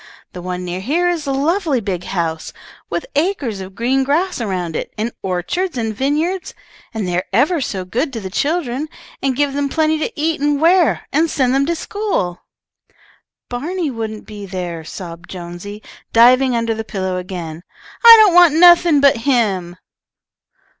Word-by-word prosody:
"The 180 - -7
one 180 0 -5
near 180 +1 -4
here 315 - 0
is 330 -4 -3
a - - 0
lovely 300 +1 0
big 185 -5 -4
house, 165 -4 -3 0.4
with - - -3
acres 290 - -1
of 190 0 -9
green 255 +5 +1
grass 320 +3 0
around 180 -6 -3
it, - - -4
and 220 +3 -2
orchards 220 - -2
and 225 -2 -2
vine 275 +6 0
yards, 355 +4 -3 0.4
and 215 -4 -3
they 175 - -1
are 180 - -1
ever 285 - +2
so 190 -6 -3
good 255 - -2
to 230 - -4
the 190 -3 -7
children, 290 - -1 0.3
and 270 -2 0
give 285 0 0
them 285 0 -1
plenty 315 +1 +1
to 315 - -2
eat 315 0 0
and 290 -1 +1
wear, 340 +1 +3
and 320 +3 +2
send 260 -4 +1
them 275 +1 +2
to 340 - 0
school." 375 - -3 1.1
"Barney 310 +6 -3
wouldn't 220 -2 -6
be 205 -2 -9
there," 175 -3 -5
sobbed 170 +1 -9
Jonesy, 180 +4 -8 0.3
diving 250 +2 +5
under 230 -1 0
the 220 0 -4
pillow 190 -4 -3
again. 175 -3 -6 0.4
"I 465 -1 +12
don't 385 - +3
want 350 -3 +6
nothing 345 -3 +6
but 280 -3 +5
him." 215 -9 0
245 Hz, 175 wpm, -18 LUFS, 190-310 Hz, 1.1 s, I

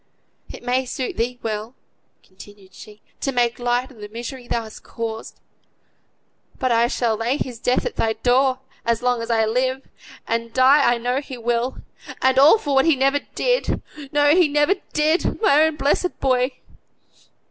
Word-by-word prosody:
"It - - -11
may 250 +2 +1
suit 255 +1 -4
thee 245 +2 -2
well," 220 +2 -4 0.5
continued 195 0 -16
she, 210 +1 -14 0.2
"to 275 - -1
make 240 -2 0
light 245 +2 -1
o' - - -15
the 210 -3 -10
misery 240 +3 -7
thou 235 - -1
hast 220 -1 -11
caused; 225 -1 -6 1.2
but 255 -2 0
I 235 0 +3
shall 235 -2 0
lay 235 +5 -1
his 245 -5 -5
death 250 +1 0
at - - -4
thy 220 0 +1
door, 255 +3 +1 0.2
as 235 +1 0
long 245 -1 +1
as 230 - -6
I 225 -1 +2
live, 255 +4 -1 0.4
and 230 0 -2
die 260 0 +5
I 240 - +1
know 245 +3 -1
he 265 -3 -9
will; 240 +2 -2 0.4
and 260 0 +3
all 295 +10 +7
for 290 -9 -3
what 270 0 +4
he 325 -3 +4
never 275 +2 +2 0.2
did - - 0 0.3
no, 290 0 +4
he 355 -3 +5
never 295 +5 +2 0.2
did; 310 +3 +1
my 300 -9 +4
own 315 0 +2
blessed 300 +5 0
boy!" 255 0 +1
250 Hz, 175 wpm, -21 LUFS, 230-275 Hz, 1.2 s, all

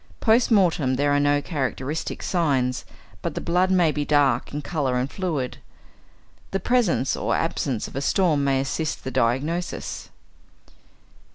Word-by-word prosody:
Post 230 +1 +3
mortem 170 - +3
there 145 +2 +1
are 145 - +3
no 145 0 +2
characteristic 140 0 -3
signs, 135 -8 0 0.4
but - - -3
the - - -2
blood 180 +2 +1
may 180 -4 +3
be 150 -1 -2
dark 145 -2 +2
in 145 +1 -4
colour 140 -7 -1
and 125 +2 -2
fluid. 160 -10 -3 0.9
The 195 - -1
presence 210 - +1
or - - -1
absence 125 -6 -1
of - - -12
a 135 - -2
storm 155 -2 +2
may 135 -1 +2
assist 155 +3 -3
the 130 - -4
diagnosis. 145 +10 -1
145 Hz, 150 wpm, -24 LUFS, 135-175 Hz, 0.9 s, Post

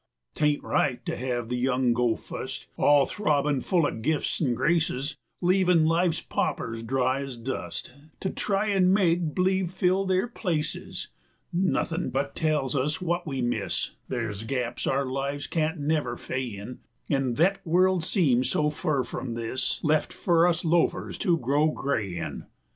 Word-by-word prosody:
'T - - -3
ain't 150 -1 +2
right 125 -2 0
to - - -2
hev 120 -2 -2
the 125 - -2
young 125 0 +2
go 120 -1 +2
fust, - - -7
All 145 -1 +5
throbbin' 150 -8 +1
full 175 -4 +2
o' - - +1
gifts 145 +10 -1
an' 125 -6 +2
graces, 155 -2 0 0.3
Leavin' 180 -2 +4
life's 165 +1 +2
paupers 115 0 -2
dry 130 +3 0
ez 135 -3 -6
dust 120 0 -5 0.3
To 190 - -1
try 205 +1 0
an' 190 -2 +4
make 175 -5 +2
b'lieve 190 -1 +2
fill 185 +2 +1
their 190 +3 +1
places: 165 -10 -3 0.4
140 180 +2 +1 0.3
Nothin' - - -2
but 140 +2 -2
tells 150 -4 0
us 150 +4 0
wut 175 -1 -1
we 135 -3 -2
miss, 115 -5 -1 0.2
Ther' 115 -4 -2
's 100 - -7
gaps 120 +1 -3
our 135 +1 +1
lives 140 +2 -3
can't 160 0 -1
never 145 -4 0
fay 130 0 -3
in, 110 +2 -7 0.3
An' 135 -4 0
thet 185 +7 +3
world 180 +1 +3
seems 135 - +2
so 150 0 +1
fur 150 -3 0
from 120 -2 -5
this 115 +2 -2
Lef' 155 -1 +2
for 170 -1 +3
us 170 -1 0
loafers 170 +1 +1
to 175 -5 +2
grow 145 +3 +2
gray 110 - -2
in! - - -5
145 Hz, 165 wpm, -27 LUFS, 125-175 Hz, 0.4 s, All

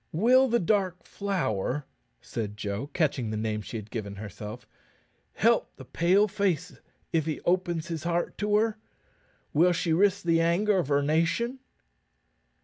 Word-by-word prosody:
"Will 250 +10 +5
the 235 -1 +2
Dark 185 -1 0
Flower," 145 - -2 0.4
said 105 -2 -5
Joe, 105 +4 -3
catching 145 -6 0
the 110 - -3
name 110 0 -2
she 115 - -6
had 105 -1 -9
given 100 -3 -5
herself, 105 +3 -8 0.7
"help - - +2
the - - -11
Pale 190 +5 +3
face 185 -3 -1 0.3
if 160 -2 +1
he 155 - -2
opens 175 -2 0
his 165 -2 -3
heart 170 0 -1
to 210 0 +1
her? 220 0 +1 0.7
Will 175 +4 +4
she 170 -1 0
risk 200 +3 +3
the 165 -1 +3
anger 190 +4 +2
of 170 - -1
her 140 0 +2
nation?" 165 - +1
165 Hz, 150 wpm, -28 LUFS, 125-195 Hz, 0.7 s, Will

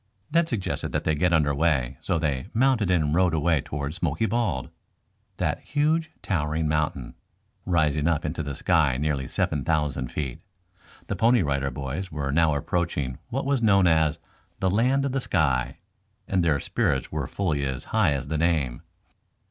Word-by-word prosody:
Ned 165 0 +3
suggested 95 -7 -3
that - - 0
they 80 - +1
get 90 +4 +1
under 75 -3 +3
way, 70 -4 +1
so 90 - 0
they 70 -5 -1
mounted 120 -5 +3
and 80 -5 +2
rode 90 -1 +3
away 80 -1 +2
towards 70 +4 -5
Smoky 85 +3 0
Bald, 105 - -1 0.7
that - - -1
huge 155 +3 0
towering 80 -3 0
mountain, 75 -4 -1 0.5
rising 75 -4 +2
up 80 -2 +1
into 80 +2 -2
the 70 -2 -4
sky 80 -8 +2
nearly 70 -2 -1
seven 75 -3 -1
thousand 75 -3 0
feet. 70 -5 -4 0.6
The - - -3
Pony 115 -2 +4
Rider 70 -2 0
Boys 70 +8 -5
were 70 -2 -2
now 80 0 +3
approaching 70 -4 -2
what 135 +3 -2
was 140 -3 +1
known 100 -4 +4
as 80 -2 +3 0.4
"The 95 -1 +1
Land 130 +7 +2
of 140 - -1
the 135 0 -1
Sky," 70 - 0 0.5
and 95 -2 +1
their 75 -4 +2
spirits 65 - -1
were 75 -4 -2
fully 80 -7 -1
as 65 -2 -3
high - - +3
as 70 0 -3
the 80 +1 -2
name. 75 -8 0
80 Hz, 170 wpm, -25 LUFS, 70-95 Hz, 0.7 s, Pony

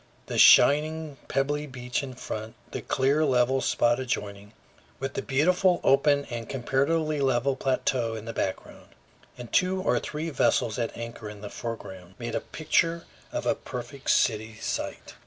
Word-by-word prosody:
The - - -2
shining, 155 0 +5
pebbly 145 +2 -1
beach 125 -1 -3
in 130 -2 -7
front, 110 -1 -6 0.2
the - - -4
clear, 140 +4 +1
level 130 -1 +2
spot 120 0 +2
adjoining, 105 -4 -4 0.5
with 135 0 -3
the - - -2
beautiful 180 +6 +2
open 140 +1 +4
and 115 -1 -5
comparatively 140 +4 0
level 130 0 +2
plateau 130 -3 0
in 110 0 -7
the 115 - -5
background, 95 - -5 0.4
and 120 -2 -9
two 185 0 +2
or 185 - +1
three 155 +2 -4
vessels 120 -4 +1
at 115 - -3
anchor 115 -2 -7
in 105 -1 -10
the 105 - -7
foreground, 95 -6 -7
made 120 -1 -5
a - - -1
picture 165 +2 0 0.3
of - - -3
a - - +3
perfect 125 +2 -7
city 110 -1 +2
site. 110 - -4
130 Hz, 155 wpm, -27 LUFS, 115-145 Hz, 0.5 s, shining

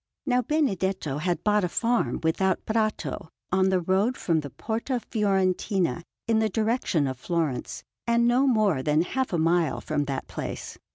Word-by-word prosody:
Now 250 -3 +2
Benedetto 190 - 0
had 175 +2 -1
bought 210 -1 +3
a 180 - 0
farm 240 +6 0
without 185 +3 +1
Prato, 215 -6 -1 0.2
on 190 +1 +3
the 190 -1 +2
road 190 +8 +1
from 165 -3 +1
the 145 -2 -6
Porta 225 - -3
Fiorentina 190 - 0 0.3
in 225 -1 +3
the 220 0 +2
direction 215 - +1
of 130 -2 -3
Florence, 160 -5 -2 0.2
and 235 0 +3
no 250 +3 +3
more 215 - +3
than 150 +3 +2
half 260 +8 -2
a 175 - +1
mile 165 -2 +2
from 145 - -1
that 135 -1 -3
place. - - -6
190 Hz, 165 wpm, -26 LUFS, 165-225 Hz, 0.3 s, bought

